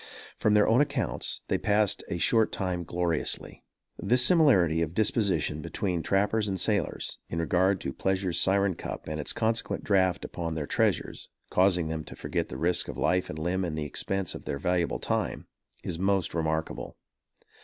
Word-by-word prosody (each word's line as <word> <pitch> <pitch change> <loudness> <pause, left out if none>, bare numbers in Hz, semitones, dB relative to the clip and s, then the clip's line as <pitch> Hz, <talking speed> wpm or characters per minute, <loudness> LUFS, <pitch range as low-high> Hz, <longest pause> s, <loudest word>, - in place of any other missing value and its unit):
From 105 -1 +2
their 105 - +5
own 115 +5 +4
accounts, 140 -4 -1
they - - 0
passed 105 -1 +2
a 85 - -2
short 110 +5 +2
time 90 -3 -2
gloriously. 85 0 0 0.4
This 125 +1 +3
similarity 110 - +4
of 85 +1 -2
disposition 100 -7 +1
between 90 0 -2
trappers 105 +4 +1
and 95 -2 -2
sailors, - - -1
in - - -4
regard 90 +4 +2
to 70 - -4
pleasure's 95 -3 0
syren 100 0 +3
cup - - -7
and 75 0 -4
its - - -1
consequent 115 0 -1
draft 95 -3 +2
upon 85 -2 -4
their 75 -2 -3
treasures, - - -1 0.2
causing 90 -3 +3
them 80 -1 -3
to - - -10
forget - - -3
the 65 - -6
risk 85 +5 +1
of - - -6
life 90 0 +1
and 75 - -6
limb 90 +4 -1
and 80 -3 -3
the 75 - -2
expense 95 +5 -2
of - - -9
their 70 - -3
valuable 90 +3 0
time, - - -2 0.4
is 85 -2 -4
most 95 -2 +1
remarkable. 80 -1 -3
90 Hz, 175 wpm, -28 LUFS, 85-100 Hz, 0.4 s, their